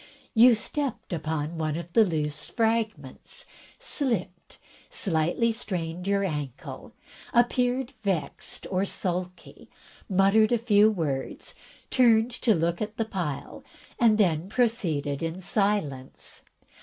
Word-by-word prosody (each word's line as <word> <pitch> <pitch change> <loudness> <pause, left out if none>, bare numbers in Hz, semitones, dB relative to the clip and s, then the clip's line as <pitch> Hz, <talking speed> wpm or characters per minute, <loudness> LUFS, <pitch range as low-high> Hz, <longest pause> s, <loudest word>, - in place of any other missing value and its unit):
You 235 +1 +7
stepped 255 0 -3
upon 160 0 -3
one 155 -1 -1
of 170 0 -8
the 225 - +7
loose 155 -5 -2
fragments, 220 - -2 0.3
slipped, 240 - -2 0.3
slightly 175 +6 +1
strained 180 -5 -4
your 200 0 +2
ankle, 150 -8 -5 0.4
appeared 245 +1 +2
vexed 185 -9 -2
or 185 0 +1
sulky, 180 -2 -4 0.4
muttered 200 +3 +4
a 240 - +4
few 215 -2 +5
words, 150 -10 -3 0.4
turned 235 -2 +4
to 225 -4 +4
look 170 +3 0
at 215 +1 -4
the 225 - 0
pile, 175 -10 -4 0.4
and 225 -4 +5
then 175 -4 +2
proceeded 170 - 0
in 165 +2 -3
silence. 190 - -2
195 Hz, 115 wpm, -27 LUFS, 160-225 Hz, 0.4 s, You